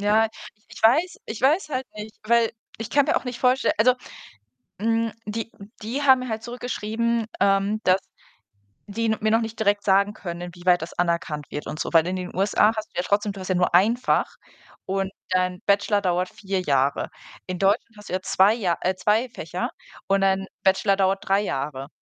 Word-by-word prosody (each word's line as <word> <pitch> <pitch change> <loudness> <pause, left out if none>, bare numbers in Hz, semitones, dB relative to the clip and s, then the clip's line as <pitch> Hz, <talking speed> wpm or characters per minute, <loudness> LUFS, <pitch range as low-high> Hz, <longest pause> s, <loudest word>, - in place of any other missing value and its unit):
Ja, 215 +2 +3 0.4
ich 235 - -12
weiß 290 +12 +3
ich 220 - -6
weiß 305 +5 +2
halt 260 -2 -2
nicht, 215 +1 -8
weil 230 +1 +3 0.3
ich 225 - -5
kann 285 -1 +3
mir 315 - +2
auch - - -1
nicht 250 -2 -6
vorstell 255 +1 +3
also, 250 +4 +5 0.8
hm, 225 +1 +1
die 225 +2 -4 0.3
die 240 +7 -3
haben 265 -2 +6
mir 255 0 -5
halt 220 0 -3
zurückgeschrieben, 235 -1 -2
ähm, 200 +2 +2
dass 185 +1 +4 0.9
die 225 +3 -2
n 220 -1 +1
mir 215 0 +1
noch 225 - +4
nicht 225 0 -5
direkt 205 -1 +2
sagen 200 +1 +3
können, 170 -4 -6
inwieweit 175 0 +1
das 160 - -7
anerkannt 170 -4 -1
wird 150 - -5
und 155 - -5
so. - - -3
Weil 165 -1 +5
in 180 - -2
den 180 -1 -6
USA 205 +3 +3
hast 215 - -4
du - - -40
ja 180 - +1
trotzdem 205 +1 +1
du 195 - -10
hast 185 - -6
ja 185 - +1
nur 180 -1 +1
1 205 +7 +5
Fach 250 - 0 0.5
und 195 0 -1 0.2
dein 185 0 0
Bachelor 205 +1 +3
dauert 180 -1 0
4 195 -1 -3
Jahre. 140 -4 +1 0.4
In 185 -1 -3
Deutschland 200 +3 +1
hast 210 0 -12
du - - -7
ja 185 0 -1
2 200 +4 +4
Ja 185 -7 0
äh, 185 - 0
2 215 +6 +1
Fächer - - -4 0.4
und 195 0 +2
dein 195 0 +1 0.2
Bachelor 195 +1 +3
dauert 195 0 0
3 195 +1 +4
Jahre. 140 -6 -3
205 Hz, 200 wpm, -24 LUFS, 185-225 Hz, 0.9 s, haben